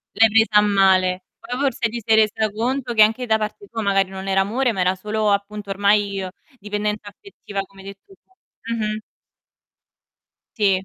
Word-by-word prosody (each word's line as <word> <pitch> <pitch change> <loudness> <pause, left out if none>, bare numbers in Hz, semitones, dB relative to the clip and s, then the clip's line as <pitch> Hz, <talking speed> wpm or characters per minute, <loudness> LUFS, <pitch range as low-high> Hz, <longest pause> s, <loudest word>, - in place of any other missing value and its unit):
L'hai 225 0 +5
presa 220 0 +3
a - - +5
male. 190 -2 +3 0.2
Poi 245 - -6
forse 265 -4 0
ti 235 +1 -5
sei 220 -1 +4
resa 215 0 +2
conto 245 +3 -2
che 220 - +4
anche 220 +4 +4
da 220 -2 +2
parte 215 - -5
tua 225 - -5
magari 195 -2 +1
non 190 0 -7
era 195 0 +2
amore, 240 +6 0
ma 190 - -2
era 185 +1 +2
solo 210 +2 -1
appunto 200 0 -3
ormai 200 0 +1 0.3
dipendenza 210 0 -3
affettiva, 205 - -7
come 195 0 -14
hai 195 - -12
detto 200 - -13
tu. 380 - -28 0.4
Mh-mh. 215 -1 -2 1.6
Ti. 205 -3 +3
210 Hz, 175 wpm, -21 LUFS, 195-225 Hz, 1.6 s, L'hai